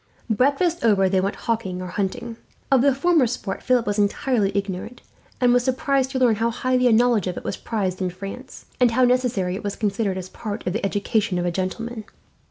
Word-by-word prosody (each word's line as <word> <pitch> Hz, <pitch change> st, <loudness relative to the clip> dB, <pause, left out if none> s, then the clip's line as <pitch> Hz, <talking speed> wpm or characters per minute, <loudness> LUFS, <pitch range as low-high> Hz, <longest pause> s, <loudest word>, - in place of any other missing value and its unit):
Breakfast 285 Hz, -, +1 dB
over, 200 Hz, -4 st, +4 dB
they 185 Hz, 0 st, +2 dB
went 195 Hz, +2 st, -1 dB
hawking 220 Hz, -6 st, -2 dB
or 185 Hz, -, -5 dB
hunting. 205 Hz, +5 st, -3 dB, 0.3 s
Of 265 Hz, -3 st, +5 dB
the 275 Hz, 0 st, +3 dB
former 310 Hz, -2 st, +3 dB
sport 215 Hz, -4 st, -4 dB
Philip 250 Hz, -2 st, +2 dB
was 205 Hz, 0 st, -1 dB
entirely 205 Hz, 0 st, +1 dB
ignorant, 200 Hz, +4 st, -4 dB, 0.4 s
and 245 Hz, -1 st, +4 dB
was 245 Hz, 0 st, +3 dB
surprised 265 Hz, +1 st, +1 dB
to 265 Hz, -, -3 dB
learn 245 Hz, -4 st, +3 dB
how 230 Hz, +2 st, +1 dB
highly 250 Hz, +1 st, +1 dB
a -, -, +4 dB
knowledge 230 Hz, -3 st, +3 dB
of 180 Hz, -, -3 dB
it -, -, -6 dB
was -, -, -3 dB
prized 190 Hz, -5 st, -3 dB
in 185 Hz, -, 0 dB
France, 195 Hz, +8 st, -9 dB
and 250 Hz, -1 st, +5 dB
how 245 Hz, +3 st, +2 dB
necessary 245 Hz, -7 st, +1 dB
it 195 Hz, -, -5 dB
was 205 Hz, -1 st, -3 dB
considered 200 Hz, -2 st, -1 dB
as 185 Hz, -1 st, -5 dB
part 210 Hz, +2 st, -6 dB
of 180 Hz, -, -1 dB
the 220 Hz, -, -3 dB
education 205 Hz, 0 st, 0 dB
of 175 Hz, -, -1 dB
a 175 Hz, -, 0 dB
gentleman. 215 Hz, +5 st, -4 dB
225 Hz, 210 wpm, -23 LUFS, 195-250 Hz, 0.4 s, Of